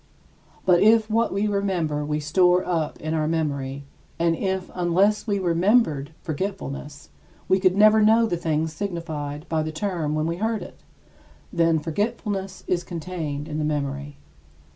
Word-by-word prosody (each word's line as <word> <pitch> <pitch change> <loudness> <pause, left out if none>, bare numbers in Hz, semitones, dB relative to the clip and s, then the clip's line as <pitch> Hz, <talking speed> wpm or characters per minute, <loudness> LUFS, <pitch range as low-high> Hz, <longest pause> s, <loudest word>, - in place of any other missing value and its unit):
But 175 -2 +5
if 220 +1 +5
what 230 +1 +2
we 200 +2 0
remember 185 -8 0
we 150 +1 -1
store 180 +4 +3
up 165 -4 -1
in 155 +1 -3
our 155 -1 0
memory; 140 -4 -2 0.3
and 165 0 +2
if, 190 0 -2
unless 185 +5 +2
we 205 -1 +1
remembered 175 - +2
forgetfulness, 150 -4 -5 0.4
we 190 - +3
could 185 0 +3
never 215 +1 +6
know 225 +2 +5
the 215 - -1
thing 160 -2 0
signified 160 -4 -5
by 160 -1 0
the 155 0 -3
term 160 -3 -2
when 155 0 0
we 170 +1 -2
heard 220 +2 -1
it - - -12 0.7
then, 165 -2 +3
forgetfulness 195 +3 -3
is 175 -1 0
contained 160 -5 -5
in 155 -1 -4
the - - 0
memory. 145 -1 -3
170 Hz, 155 wpm, -24 LUFS, 155-195 Hz, 0.7 s, never